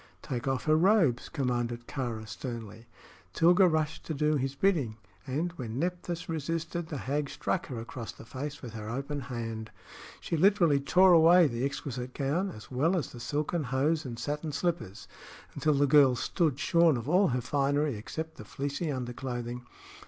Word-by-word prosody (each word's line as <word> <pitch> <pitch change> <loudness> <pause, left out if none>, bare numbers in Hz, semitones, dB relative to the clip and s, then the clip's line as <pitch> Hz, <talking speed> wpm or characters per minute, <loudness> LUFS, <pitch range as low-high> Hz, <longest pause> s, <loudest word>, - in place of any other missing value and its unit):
"Take 125 -1 -4
off 135 -1 0
her 155 0 +3
robes," 165 - +3
commanded 120 -4 -2
Kāra, 120 -6 -4
sternly. 115 -2 -7 0.5
Tilga 175 +3 +5
rushed 155 -2 -1
to 160 - -2
do 150 +2 +2
his 135 0 -1
bidding, 140 - +1 0.3
and, 155 +7 -1
when 115 -3 -5
Nephthys 175 +1 -3
resisted, 165 +1 -3
the 150 - -5
hag 140 +2 -2
struck 185 - -2
her 125 -5 -5
across 115 0 -6
the - - -13
face 140 +5 -6
with 120 -3 -7
her 110 -1 -6
open 140 +4 -3
hand. 115 -4 -5 0.5
She - - -3
literally 170 -4 +4
tore 180 +6 +5
away 170 +2 +7
the 120 -3 -1
exquisite 130 -2 -4
gown, 155 +8 0
as 110 - -11
well 160 +9 +2
as 160 - -3
the 120 - -10
silken 150 +5 -2
hose 145 +5 +1
and 120 -5 -6
satin 150 +5 -3
slippers, 140 - -2 0.5
until 155 -1 +1
the 145 +1 +4
girl 140 -2 +6
stood 150 +2 0
shorn 170 -5 +4
of 120 - -6
all 185 +5 +4
her 125 0 0
finery 140 +2 +1
except 160 +9 -6
the - - -8
fleecy 145 +3 -3
underclothing. 125 -1 -5
140 Hz, 170 wpm, -29 LUFS, 125-160 Hz, 0.5 s, away